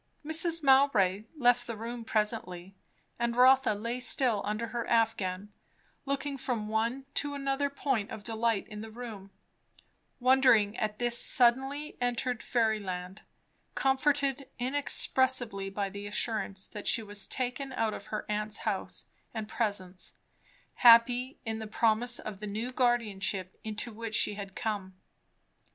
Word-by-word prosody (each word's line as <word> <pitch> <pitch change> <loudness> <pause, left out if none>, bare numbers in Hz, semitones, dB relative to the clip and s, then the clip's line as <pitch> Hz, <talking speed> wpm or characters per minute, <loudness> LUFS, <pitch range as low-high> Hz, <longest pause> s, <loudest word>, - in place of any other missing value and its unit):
Mrs. 325 +1 +3
Mowbray 230 -8 +4
left 245 -2 +3
the 230 -2 -5
room 230 +2 -6
presently; 210 -5 -1 0.5
and 235 0 0
Rotha 255 -2 +5
lay 230 +4 -3
still 245 -4 +2
under 215 +3 -3
her 235 +1 -3
affghan, 205 -4 0 0.6
looking 280 0 -2
from 225 -5 -3
one 230 +5 -1
to 285 0 -1
another 275 0 -1
point 265 -6 -1
of 215 - -8
delight 225 -2 -1
in 210 0 -8
the 220 - -8
room, 220 -4 -8 0.9
wondering 250 -5 +4
at 210 -1 -2
this 240 -1 +2
suddenly 270 +4 +2
entered 245 0 -1
fairyland, 205 -5 -1 0.5
comforted 275 0 +1
inexpressibly 255 -5 +1
by 200 0 -2
the 200 +1 -7
assurance 205 -2 -2
that 210 -2 -8
she 225 - +2
was 205 -2 -3
taken 255 +1 -3
out 225 -4 -1
of 200 - -8
her 215 0 -4
aunt's 210 0 -1
house 205 -3 -2 0.3
and 220 -1 -4
presence, 195 -5 -3 0.6
happy 245 +2 +6
in 220 0 -3
the 220 - -6
promise 230 +3 +2
of 195 - -7
the 210 - -6
new 220 +5 -4
guardianship 210 -7 0
into 220 +1 -4
which 225 0 -5
she 210 - +3
had 200 -1 -8
come. 200 -4 -3
225 Hz, 135 wpm, -30 LUFS, 210-255 Hz, 0.9 s, happy